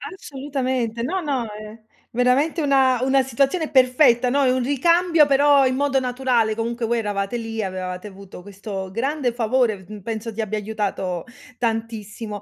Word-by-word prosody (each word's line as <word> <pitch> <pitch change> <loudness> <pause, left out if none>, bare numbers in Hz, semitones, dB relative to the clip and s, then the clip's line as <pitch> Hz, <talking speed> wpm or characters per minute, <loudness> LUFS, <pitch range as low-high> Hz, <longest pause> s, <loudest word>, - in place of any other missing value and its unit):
Assolutamente, 260 - -3
no, 355 +10 -2
no, 275 -6 -1
è 215 +1 -10 0.3
veramente 260 +7 +2
una 265 -3 +3
una 265 0 +3
situazione 275 +6 0
perfetta, 255 -2 +4
no, 280 +2 +2
è 255 - +3
un 255 0 0
ricambio 330 +5 +3
però 280 0 +4
in 255 0 +1
modo 275 0 +1
naturale, 250 -3 0
comunque 230 +1 -2
voi 235 +1 0
eravate 205 +1 -2
lì, 225 -1 -4
avevate 185 0 -5
avuto 195 -2 -12
questo 195 -1 -7
grande 260 +3 -1
favore 235 -1 +1
v 190 - -15
d 210 - -15
mhmm, 210 - -9
penso 225 +2 -5
ti 225 - -3
abbia 215 0 -3
aiutato 200 -4 -3 0.3
tantissimo. 225 -2 -4
240 Hz, 165 wpm, -22 LUFS, 215-270 Hz, 0.3 s, perfetta